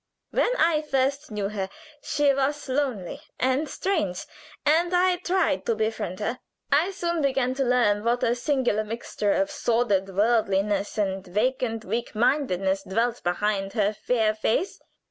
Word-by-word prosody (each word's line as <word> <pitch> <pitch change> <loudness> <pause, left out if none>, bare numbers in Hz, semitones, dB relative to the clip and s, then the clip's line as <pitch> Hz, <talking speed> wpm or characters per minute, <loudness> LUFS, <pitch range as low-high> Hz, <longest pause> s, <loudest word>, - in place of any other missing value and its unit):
When - - +2
I 325 -2 +3
first 275 0 0
knew 205 -2 -2
her 195 -2 -3 0.3
she 290 -1 +2
was 275 +2 -1
lonely 255 -9 -2 0.2
and 260 +4 +1
strange, 265 - -1 0.4
and 335 +4 +3
I 360 0 +3
tried 355 - 0
to 230 - +2
befriend 215 -4 -2
her. 235 +4 -2 0.3
I 305 +6 +4
soon 345 -3 -2
began 265 -2 +1
to 270 +1 0
learn 235 -5 +2
what 240 +1 +1
a 235 - +3
singular 245 -4 0
mixture 215 -2 -2
of 295 0 0
sordid 230 -8 +1
worldliness 205 -2 +1
and 195 -2 -1
vacant 225 +3 -1
weak 230 +4 -3
mindedness 195 -6 +1
dwelt 230 +5 -1
behind 195 +2 -1
her 210 -2 +1
fair 220 0 +1
face. 220 - -1
240 Hz, 145 wpm, -25 LUFS, 205-280 Hz, 0.4 s, I